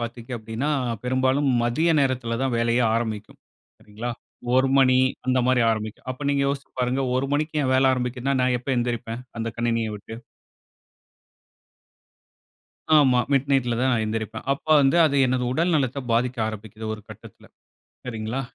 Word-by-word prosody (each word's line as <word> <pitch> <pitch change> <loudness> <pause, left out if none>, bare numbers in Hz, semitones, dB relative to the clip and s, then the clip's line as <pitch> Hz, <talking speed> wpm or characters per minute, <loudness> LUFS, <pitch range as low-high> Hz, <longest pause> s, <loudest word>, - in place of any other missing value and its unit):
பாத்தீங்க 120 +1 -7
அப்டின்னா, 115 +7 -3 0.3
பெரும்பாலும் 130 +3 +1
மதிய 140 +8 +1
நேரத்தில 125 -4 -1
தான் 130 -2 0
வேலையே 115 +1 +2
ஆரம்பிக்கும். 110 -3 -3 0.4
சரிங்களா, 110 +4 -6 0.4
1 130 +1 +4
மணி 130 -1 +5 0.3
அந்த 130 0 +2
மாரி 130 -1 +3
ஆரம்பிக்கும். 110 +2 -4
அப்ப 140 +3 -6
நீங்க 140 -1 +1
யோசிச்சு 140 0 -3
பாருங்க. 125 +2 0 0.2
1 135 +1 -1
மணிக்கு 150 +1 -1
என் 130 - +1
வேலை 130 +1 +4
ஆரம்பிக்கிதுன்னா, 125 +2 -2
நான் 125 -1 +2
எப்ப 125 - -13
எழுந்திரிப்பேன்? 120 -1 -3 0.2
அந்த 115 0 -2
கணினிய 115 -1 0
விட்டு, 110 +2 -10 2.8
ஆமா, 130 -4 +5
மிட்நைட்ல 135 -3 +1
தான் 130 +1 +2
நான் 115 - +1
எந்திரிப்பேன். 110 0 -4
அப்ப 140 - -7
வந்து 135 +3 +3
அது 140 - 0
எனது 125 0 0
உடல் 170 +6 +1
நலத்தை 140 -2 0
பாதிக்க 125 +2 0
ஆரம்பிக்கிது. 110 +1 -8
ஒரு 110 - -11
கட்டத்தில - - -14 0.6
சரிங்களா, 115 +2 -3
125 Hz, 145 wpm, -24 LUFS, 115-135 Hz, 2.8 s, மணி